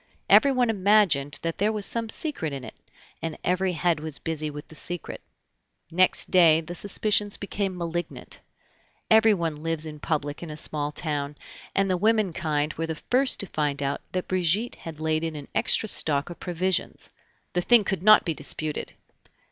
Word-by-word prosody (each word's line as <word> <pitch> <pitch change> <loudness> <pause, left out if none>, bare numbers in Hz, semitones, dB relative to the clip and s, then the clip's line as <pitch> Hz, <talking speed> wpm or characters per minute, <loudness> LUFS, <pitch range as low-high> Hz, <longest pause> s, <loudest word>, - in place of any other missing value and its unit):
Everyone 255 -5 +5
imagined 190 -9 +4
that 165 -1 -3
there 210 +2 +2
was 210 -2 -2
some 230 -1 -1
secret 220 - -1
in 135 -2 -6
it, - - -9 0.5
and 165 -2 -4
every 185 +1 0
head 165 0 0
was 155 -1 -5
busy 155 -2 -4
with 145 0 -9
the - - -15
secret. 175 +2 -6 0.7
Next 185 +2 +3
day 165 -3 +6
the 165 +2 -7
suspicions 205 +2 0
became 195 -2 -3
malignant. 175 0 -5 0.7
Everyone 195 -9 +3
lives 165 -1 -2
in 150 -1 -8
public 145 -1 -3
in 170 - -7
a 150 - -7
small 150 -1 -2
town, 145 -2 -3 0.4
and 195 0 +2
the 185 -1 +1
women 215 -2 +2
kind 155 -4 -1
were 165 +1 -4
the 160 - -3
first 255 - +1
to - - -4
find 145 -5 -2
out 140 +1 -2
that 185 -1 -3
Brigitte 185 +5 0
had 160 -2 -10
laid 155 0 0
in 160 -1 -3
an 145 -2 -9
extra 220 - +2
stock 150 -5 +2
of 175 - -10
provisions. 180 +1 -1 0.4
The 180 - +1
thing 235 +3 +5
could 195 -3 -2
not 215 +2 +6
be 165 - 0
disputed. 150 +1 -3
170 Hz, 175 wpm, -25 LUFS, 155-195 Hz, 0.7 s, day